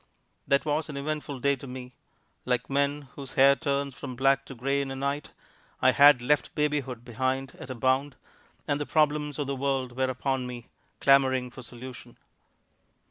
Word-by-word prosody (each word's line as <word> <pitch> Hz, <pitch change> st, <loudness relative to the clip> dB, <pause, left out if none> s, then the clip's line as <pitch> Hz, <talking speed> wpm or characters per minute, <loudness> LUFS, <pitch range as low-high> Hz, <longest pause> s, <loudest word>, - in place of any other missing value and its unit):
That 140 Hz, +2 st, +3 dB
was 155 Hz, +1 st, 0 dB
an 145 Hz, -, -5 dB
eventful 145 Hz, -2 st, -4 dB
day 140 Hz, +2 st, +3 dB
to 135 Hz, -, -10 dB
me. 125 Hz, 0 st, -8 dB, 0.5 s
Like 125 Hz, +1 st, -1 dB
men 140 Hz, 0 st, 0 dB
whose 135 Hz, -2 st, -8 dB
hair 135 Hz, +1 st, +7 dB
turns 140 Hz, -2 st, -1 dB
from 125 Hz, -, -7 dB
black 135 Hz, +1 st, +2 dB
to 135 Hz, -, -8 dB
gray 135 Hz, +3 st, 0 dB
in 140 Hz, -, -4 dB
a 135 Hz, -, -4 dB
night, 140 Hz, +2 st, -2 dB, 0.5 s
I 130 Hz, -, +5 dB
had 140 Hz, -2 st, +7 dB
left 150 Hz, +3 st, +1 dB
babyhood 145 Hz, -5 st, -1 dB
behind 130 Hz, +2 st, -2 dB
at -, -, -9 dB
a 130 Hz, -, -4 dB
bound, 130 Hz, +3 st, +1 dB, 0.5 s
and 145 Hz, 0 st, 0 dB
the 145 Hz, -, -3 dB
problems 150 Hz, -1 st, +1 dB
of 145 Hz, -, -1 dB
the 140 Hz, 0 st, -2 dB
world 130 Hz, -2 st, -1 dB
were 130 Hz, 0 st, +1 dB
upon 130 Hz, 0 st, -1 dB
me, 120 Hz, -2 st, -8 dB, 0.3 s
clamoring 130 Hz, -2 st, +4 dB
for 130 Hz, -, -10 dB
solution. 125 Hz, +1 st, -10 dB
135 Hz, 180 wpm, -28 LUFS, 130-140 Hz, 0.5 s, hair